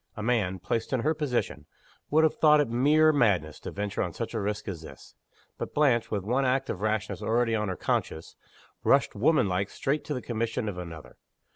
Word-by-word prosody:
A 105 Hz, -, -4 dB
man, 105 Hz, -6 st, +1 dB
placed 110 Hz, +7 st, -3 dB
in 130 Hz, -, +1 dB
her 155 Hz, +6 st, +1 dB
position, 150 Hz, -6 st, -2 dB, 0.4 s
would 155 Hz, +2 st, +4 dB
have 160 Hz, -, +3 dB
thought 150 Hz, -1 st, +5 dB
it 145 Hz, -, +2 dB
mere 150 Hz, +6 st, +4 dB
madness 95 Hz, -, +1 dB
to -, -, -7 dB
venture 100 Hz, 0 st, -3 dB
on 90 Hz, -4 st, -2 dB
such 115 Hz, 0 st, -5 dB
a 115 Hz, -, -1 dB
risk 105 Hz, +2 st, -3 dB
as 90 Hz, -5 st, -5 dB
this. 80 Hz, -, -13 dB, 0.5 s
But -, -, -5 dB
Blanche 130 Hz, -6 st, +3 dB
with 100 Hz, -3 st, -2 dB
one 125 Hz, +7 st, +1 dB
act 130 Hz, +1 st, +1 dB
of 90 Hz, -, -6 dB
rashness 105 Hz, -3 st, -1 dB
already 115 Hz, 0 st, +1 dB
on 105 Hz, -2 st, 0 dB
her 95 Hz, -, -2 dB
conscience 80 Hz, -2 st, -2 dB, 0.5 s
rushed, -, -, +3 dB
woman 140 Hz, +1 st, +3 dB
like, 95 Hz, +2 st, -1 dB
straight 145 Hz, +3 st, -2 dB
to 150 Hz, -, -3 dB
the 125 Hz, -, -4 dB
commission 115 Hz, -1 st, -2 dB
of 95 Hz, -4 st, -4 dB
another. 80 Hz, -3 st, -9 dB
115 Hz, 210 wpm, -27 LUFS, 100-135 Hz, 0.5 s, thought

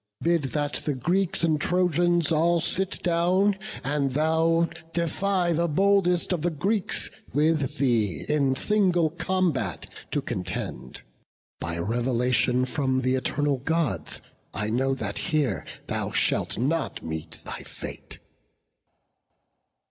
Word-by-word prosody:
Bid 170 Hz, -3 st, +1 dB
that 145 Hz, +2 st, -1 dB
the 150 Hz, -, -2 dB
Greeks 175 Hz, +8 st, 0 dB
and 155 Hz, -2 st, +2 dB
Trojans 175 Hz, -2 st, +2 dB
all 170 Hz, +2 st, +3 dB
sit 190 Hz, +4 st, -1 dB
down, 180 Hz, +4 st, +3 dB, 0.3 s
And 140 Hz, 0 st, 0 dB
thou 160 Hz, +4 st, +2 dB, 0.3 s
defy 175 Hz, +1 st, +1 dB
the 170 Hz, +2 st, +1 dB
boldest 185 Hz, +1 st, +2 dB
of 170 Hz, -, -1 dB
the 175 Hz, -, +1 dB
Greeks 190 Hz, +6 st, -1 dB, 0.2 s
With 150 Hz, -2 st, +2 dB
thee 110 Hz, -, +1 dB
in 140 Hz, -3 st, +2 dB
single 180 Hz, -3 st, +2 dB
combat 170 Hz, -, -1 dB, 0.2 s
to -, -, 0 dB
contend; 90 Hz, -7 st, -5 dB, 0.6 s
By 85 Hz, 0 st, -3 dB
revelation 120 Hz, +5 st, +1 dB
from 130 Hz, 0 st, 0 dB
th' 130 Hz, +1 st, +2 dB
eternal 140 Hz, +2 st, 0 dB
Gods, 160 Hz, +1 st, -1 dB, 0.3 s
I 105 Hz, +1 st, -1 dB
know 135 Hz, +3 st, +1 dB
that 105 Hz, -6 st, -4 dB
here 155 Hz, -5 st, 0 dB, 0.2 s
thou -, -, -2 dB
shalt -, -, 0 dB
not 150 Hz, +7 st, -1 dB
meet 80 Hz, -1 st, -5 dB
thy -, -, -4 dB
fate." -, -, -7 dB
155 Hz, 120 wpm, -26 LUFS, 130-175 Hz, 0.6 s, all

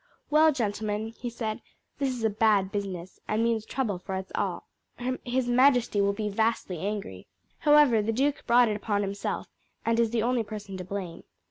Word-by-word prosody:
"Well, 310 Hz, +1 st, +6 dB
gentlemen," 215 Hz, -3 st, -2 dB
he 240 Hz, +2 st, -6 dB
said; 225 Hz, -2 st, -4 dB, 0.4 s
"this 275 Hz, -1 st, +1 dB
is 250 Hz, -3 st, -4 dB
a 220 Hz, -, +3 dB
bad 205 Hz, -2 st, +3 dB
business, 190 Hz, -3 st, -5 dB
and 215 Hz, +2 st, +1 dB
means 225 Hz, -2 st, 0 dB
trouble 220 Hz, -9 st, -2 dB
for 190 Hz, +1 st, -5 dB
us 190 Hz, 0 st, -5 dB
all. -, -, -2 dB, 0.6 s
His 250 Hz, 0 st, -1 dB
majesty 245 Hz, -4 st, +4 dB
will 200 Hz, 0 st, +3 dB
be 210 Hz, +1 st, -3 dB
vastly 210 Hz, -4 st, 0 dB
angry. 195 Hz, -, -4 dB, 0.3 s
However, 295 Hz, -7 st, +5 dB
the 215 Hz, +2 st, 0 dB
duke 275 Hz, +5 st, 0 dB
brought 240 Hz, 0 st, +6 dB
it 215 Hz, -, 0 dB
upon 205 Hz, -1 st, -1 dB
himself, 200 Hz, 0 st, -3 dB, 0.4 s
and 230 Hz, 0 st, +2 dB
is 230 Hz, -1 st, +3 dB
the 225 Hz, -1 st, 0 dB
only 245 Hz, 0 st, +2 dB
person 205 Hz, -2 st, -7 dB
to 185 Hz, -, -5 dB
blame. 185 Hz, -2 st, -6 dB
220 Hz, 185 wpm, -28 LUFS, 200-240 Hz, 0.6 s, Well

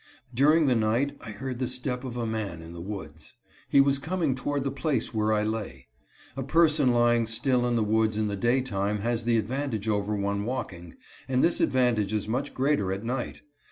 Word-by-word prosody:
During 150 Hz, +6 st, +4 dB
the 130 Hz, -, +3 dB
night 115 Hz, +5 st, +1 dB
I 115 Hz, -, -9 dB
heard 125 Hz, +3 st, -5 dB
the 130 Hz, -, 0 dB
step 125 Hz, 0 st, -3 dB
of 125 Hz, -2 st, -5 dB
a 120 Hz, -, -2 dB
man 105 Hz, -7 st, -4 dB
in 85 Hz, +1 st, -10 dB
the 85 Hz, -, -8 dB
woods. 85 Hz, -5 st, -8 dB, 0.3 s
He -, -, +5 dB
was 140 Hz, 0 st, +4 dB
coming 160 Hz, -1 st, -1 dB
toward 140 Hz, +2 st, -2 dB
the 135 Hz, -, -1 dB
place 135 Hz, -4 st, -1 dB
where 110 Hz, 0 st, +1 dB
I 105 Hz, -1 st, +2 dB
lay. 100 Hz, -, -4 dB, 0.5 s
A 135 Hz, -, -3 dB
person 150 Hz, -1 st, +4 dB
lying 120 Hz, -1 st, +3 dB
still 125 Hz, +2 st, +1 dB
in 120 Hz, -, 0 dB
the 115 Hz, -, +2 dB
woods 110 Hz, 0 st, +1 dB
in 110 Hz, -, +1 dB
the 100 Hz, -, -2 dB
day 120 Hz, +6 st, +2 dB
time 105 Hz, -4 st, -2 dB
has 115 Hz, +1 st, -1 dB
the 120 Hz, -1 st, +3 dB
advantage 115 Hz, -1 st, -2 dB
over 105 Hz, 0 st, 0 dB
one 100 Hz, 0 st, -1 dB
walking, 95 Hz, -8 st, -5 dB, 0.3 s
and 130 Hz, 0 st, +2 dB
this 170 Hz, -, +2 dB
advantage 120 Hz, -6 st, +2 dB
is 105 Hz, -1 st, -1 dB
much 130 Hz, +6 st, -2 dB
greater 130 Hz, -8 st, +1 dB
at 95 Hz, +2 st, -3 dB
night. 120 Hz, +1 st, -4 dB
120 Hz, 205 wpm, -27 LUFS, 105-130 Hz, 0.5 s, He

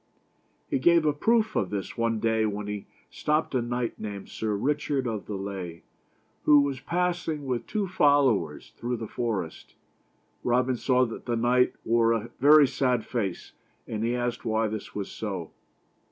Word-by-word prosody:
He -, -, 0 dB
gave 170 Hz, +3 st, +4 dB
a 150 Hz, -, +3 dB
proof 220 Hz, +7 st, +2 dB
of 95 Hz, -, +1 dB
this 100 Hz, -2 st, -4 dB
one 115 Hz, -1 st, 0 dB
day 110 Hz, 0 st, +2 dB
when 105 Hz, 0 st, -3 dB
he 105 Hz, -1 st, -5 dB, 0.2 s
stopped 150 Hz, 0 st, 0 dB
a 130 Hz, -, +2 dB
knight 120 Hz, 0 st, -3 dB
named 100 Hz, -2 st, -6 dB
Sir 110 Hz, -2 st, -2 dB
Richard 140 Hz, +3 st, 0 dB
of 110 Hz, -4 st, -3 dB
the 105 Hz, -, -4 dB
Lea, 95 Hz, -4 st, -6 dB, 0.6 s
who 145 Hz, -1 st, +7 dB
was 140 Hz, -2 st, -1 dB
passing, 170 Hz, -2 st, -1 dB
with 125 Hz, -2 st, -2 dB
two 210 Hz, -3 st, -1 dB
followers, 140 Hz, -, +2 dB
through 120 Hz, +1 st, -2 dB
the 110 Hz, -, -5 dB
forest. 105 Hz, -10 st, -4 dB, 0.7 s
Robin 125 Hz, +1 st, +2 dB
saw 130 Hz, +1 st, +2 dB
that 115 Hz, +1 st, -8 dB
the 120 Hz, -, +1 dB
knight 125 Hz, +2 st, +3 dB
wore 115 Hz, 0 st, +3 dB
a 115 Hz, 0 st, -3 dB
very 145 Hz, +2 st, +8 dB
sad 125 Hz, -3 st, 0 dB
face, 100 Hz, -7 st, -3 dB, 0.3 s
and 110 Hz, 0 st, -3 dB
he 120 Hz, +1 st, +1 dB
asked 120 Hz, -1 st, -2 dB
why 110 Hz, 0 st, +1 dB
this 110 Hz, -1 st, -6 dB
was 100 Hz, -2 st, -4 dB
so. 95 Hz, -6 st, -5 dB
120 Hz, 170 wpm, -27 LUFS, 105-140 Hz, 0.7 s, very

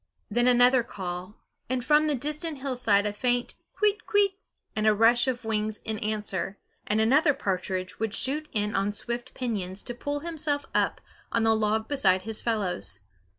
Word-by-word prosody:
Then 240 Hz, +1 st, +2 dB
another 250 Hz, +1 st, +5 dB
call, 185 Hz, -2 st, -7 dB, 0.3 s
and 255 Hz, -1 st, -1 dB
from 300 Hz, +2 st, +4 dB
the 300 Hz, -, +1 dB
distant 300 Hz, +4 st, -2 dB
hillside 245 Hz, -7 st, +1 dB
a 205 Hz, -, -1 dB
faint 245 Hz, +3 st, 0 dB, 0.3 s
kwit 420 Hz, 0 st, +3 dB
kwit 405 Hz, -1 st, +3 dB, 0.4 s
and 215 Hz, 0 st, +1 dB
a 215 Hz, -, +5 dB
rush 235 Hz, +4 st, +5 dB
of 245 Hz, -2 st, -2 dB
wings 215 Hz, -1 st, -1 dB
in 220 Hz, -1 st, -1 dB
answer, 210 Hz, -2 st, -2 dB, 0.3 s
and 210 Hz, +1 st, +2 dB
another 275 Hz, +7 st, +4 dB
partridge 185 Hz, 0 st, -3 dB
would 225 Hz, -1 st, -1 dB
shoot 300 Hz, +3 st, +1 dB
in 210 Hz, 0 st, -1 dB
on 195 Hz, +1 st, 0 dB
swift 235 Hz, +4 st, -3 dB
pinions 200 Hz, -6 st, -3 dB
to 245 Hz, -, -4 dB
pull 285 Hz, +4 st, -4 dB
himself 305 Hz, -3 st, -1 dB
up -, -, +1 dB, 0.3 s
on 230 Hz, -, +1 dB
the 225 Hz, 0 st, +4 dB
log 220 Hz, 0 st, 0 dB
beside 190 Hz, -10 st, +2 dB
his 220 Hz, +1 st, -3 dB
fellows. 180 Hz, -, -1 dB
225 Hz, 170 wpm, -27 LUFS, 210-265 Hz, 0.4 s, another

